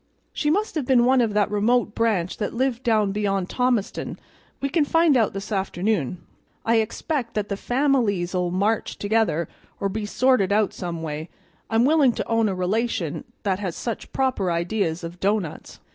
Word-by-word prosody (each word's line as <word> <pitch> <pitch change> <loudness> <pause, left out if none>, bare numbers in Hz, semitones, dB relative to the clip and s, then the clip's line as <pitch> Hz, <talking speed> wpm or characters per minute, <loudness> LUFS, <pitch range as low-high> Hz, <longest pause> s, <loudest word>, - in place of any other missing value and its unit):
"She 295 - 0
must 415 +7 +1
have 295 -6 -2
been 245 -3 +5
one 260 0 +4
of 220 -3 0
that 205 -1 +2
remote 215 +2 +2
branch 210 -7 0
that 215 - -3
lived 255 -1 0
down 215 -5 +2
beyond 195 -2 -1
Thomaston. 250 -5 -1 0.4
We 275 - -1
can 305 +2 +2
find 325 0 +3
out 225 -4 +2
this 195 +2 -6
afternoon. 190 - -1 0.4
I 230 0 +3
expect 235 +3 -2
that 210 -1 -1
the 200 - -1
families'll 205 -9 +1
march 200 +5 0
together, 205 -7 +1 0.3
or 200 - 0
be 210 +1 -3
sorted 250 -4 +2
out 210 -1 +2
some 170 -2 -5
way. 155 +1 -5 0.4
I'm 225 +2 +3
willing 285 -4 +4
to - - -4
own 225 -2 +2
a 190 - -2
relation 185 -3 -1 0.2
that 190 -2 0
has 185 -5 -3
such 235 -3 -5
proper 255 -9 0
ideas 170 0 -1
of 170 +1 -7
doughnuts." 195 -5 -2
210 Hz, 175 wpm, -24 LUFS, 185-245 Hz, 0.4 s, been